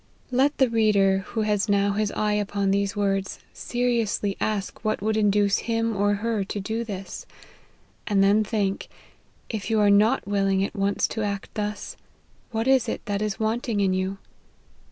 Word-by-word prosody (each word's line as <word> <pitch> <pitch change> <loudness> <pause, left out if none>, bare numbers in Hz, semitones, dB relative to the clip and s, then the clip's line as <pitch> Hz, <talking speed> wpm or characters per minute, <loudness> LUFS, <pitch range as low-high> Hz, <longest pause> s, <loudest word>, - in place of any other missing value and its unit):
Let 270 +4 +2
the 265 - +4
reader, 210 -4 +3
who 225 - -2
has 210 0 0
now 200 0 +3
his 210 0 -1
eye 210 -1 0
upon 205 -1 0
these 200 +1 0
words, 195 -1 -1 0.2
seriously 235 -5 -1
ask 210 -2 -2
what 215 0 0
would 215 +2 0
induce 205 -1 +3
him 225 -1 0
or 205 +1 +2
her 215 0 -1
to 200 +2 -5
do 220 +4 -3
this; 195 -4 -7 0.8
and 200 -2 +3
then 205 +2 +4
think, 205 -2 -2 0.6
if 220 -2 -4
you 220 -1 +2
are 205 -1 +5
not 215 +5 +3
willing 195 -1 +1
at 200 - -4
once 200 0 +1
to 220 - -3
act 200 -2 -3
thus, 210 -1 -4 0.5
what 225 +1 -2
it 265 -3 +4
is - - -2
that 205 -1 -2
is 215 0 -2
wanting 220 0 -1
in 195 -2 +2
you. 190 +1 -2
205 Hz, 175 wpm, -25 LUFS, 200-220 Hz, 0.8 s, are